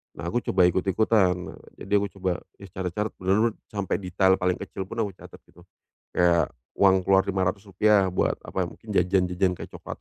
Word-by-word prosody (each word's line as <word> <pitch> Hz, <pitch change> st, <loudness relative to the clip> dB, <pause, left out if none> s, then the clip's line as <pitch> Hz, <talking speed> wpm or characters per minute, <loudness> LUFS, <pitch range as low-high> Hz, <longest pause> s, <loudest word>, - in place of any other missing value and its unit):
Nah, -, -, -8 dB
aku 120 Hz, -, 0 dB
coba 95 Hz, -, +3 dB
ikut-ikutan, 95 Hz, +1 st, +2 dB
nah, 90 Hz, -, -8 dB, 0.2 s
jadi 100 Hz, +1 st, 0 dB
aku 100 Hz, -, -1 dB
coba 95 Hz, -1 st, 0 dB, 0.3 s
ya 100 Hz, -, -9 dB
catat-catat 95 Hz, +4 st, -3 dB
benar-benar 105 Hz, +5 st, +2 dB, 0.2 s
sampai 100 Hz, -2 st, -1 dB
detail 95 Hz, 0 st, +2 dB
paling 90 Hz, 0 st, +1 dB
kecil 95 Hz, -1 st, -6 dB
pun, 115 Hz, +2 st, -3 dB
aku 100 Hz, -, -3 dB
catat -, -, -14 dB
gitu, 85 Hz, +1 st, -19 dB, 0.5 s
kayak 85 Hz, -1 st, +3 dB, 0.2 s
uang 95 Hz, -1 st, +5 dB
keluar 95 Hz, 0 st, +4 dB
Rp.500 100 Hz, +1 st, +1 dB
buat -, -, +1 dB
apa, 95 Hz, -, -2 dB
mungkin 110 Hz, -, -16 dB
jajan-jajan 90 Hz, 0 st, +2 dB
kayak -, -, -8 dB
cokelat -, -, -8 dB
95 Hz, 175 wpm, -25 LUFS, 90-100 Hz, 0.5 s, uang